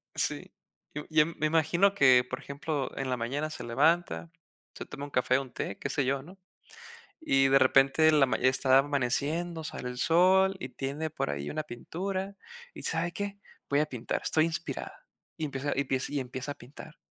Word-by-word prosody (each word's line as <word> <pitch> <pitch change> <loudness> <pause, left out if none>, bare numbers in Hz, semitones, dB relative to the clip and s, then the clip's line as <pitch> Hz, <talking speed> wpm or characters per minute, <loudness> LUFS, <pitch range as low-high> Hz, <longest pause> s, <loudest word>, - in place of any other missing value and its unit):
Sí. - - -2 0.4
Yo 150 - -5
yo 155 -1 +4
me 160 -2 -2
imagino 165 +5 +3
que, 130 -6 +6
por 130 - -5
ejemplo, 145 0 -3
en 135 -1 -3
la 125 - 0
mañana 140 +7 -2
se 135 - -6
levanta, 160 +7 +1 0.4
se - - -7
toma 145 -1 -7
un 145 - -9
café 130 0 +2
o - - -2
un 130 -2 -12
té, 100 - -5
qué 140 - -3
sé 140 0 0
yo, 135 +1 0
¿no? 185 +6 -14 0.8
Y 135 - +3
de 135 0 +6
repente 135 +4 +5
la 145 -3 +5
ma 110 - 0
está 130 +1 +4
amaneciendo, 145 +5 0
sale 125 -4 -5
el 125 - -8
sol 190 +5 +4
y 130 - -6
tiene 140 +5 -4
por 110 - -2
ahí 70 0 -4
una 155 0 -2
pintura. 190 +9 -5 0.4
Y - - -9
¿sabe 170 +1 0
qué? 200 +1 -5 0.3
Voy 140 +1 +2
a 155 - +2
pintar, 125 -6 -4
estoy 155 0 +3
inspirada. 165 0 -5 0.3
Y 160 - -3
empieza 140 0 -3
y - - +2
empiece 135 +1 -2
y 140 - 0
empieza 130 +2 -5
a - - -15
pintar. 145 +5 -13
145 Hz, 195 wpm, -29 LUFS, 130-160 Hz, 0.8 s, que